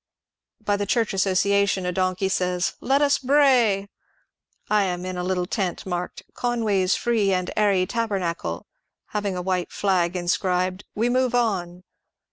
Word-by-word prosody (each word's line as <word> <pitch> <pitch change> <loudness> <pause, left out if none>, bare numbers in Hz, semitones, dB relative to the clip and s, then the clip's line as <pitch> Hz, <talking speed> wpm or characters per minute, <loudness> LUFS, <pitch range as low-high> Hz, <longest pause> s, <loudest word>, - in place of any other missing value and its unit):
By 205 0 +1
the 200 0 -3
Church 225 0 +1
Association 195 0 +2
a 180 - 0
donkey 185 +1 0
says 180 -1 0
" - - -41
Let 275 +3 +2
us 285 -1 +3
bray! 250 -8 +3 0.4
" - - -49
I 210 -1 +3
am 180 -1 -3
in 185 0 -4
a 180 - -3
little 180 -1 -1
tent 185 -2 -3
marked 180 -1 -4
" - - -54
Conway's 215 -6 +1
Free 220 -5 +1
and 185 -1 -1
Airy 200 -3 +3
Taber 230 -1 -1
nacle," 170 - -3 0.5
having 205 -3 -2
a 180 - -3
white 180 -1 -1
flag 185 -3 0
inscribed 180 +1 -1
" - - -52
We 225 +3 +1
move 250 0 +1
on." 180 -7 -1
190 Hz, 170 wpm, -24 LUFS, 180-215 Hz, 0.5 s, us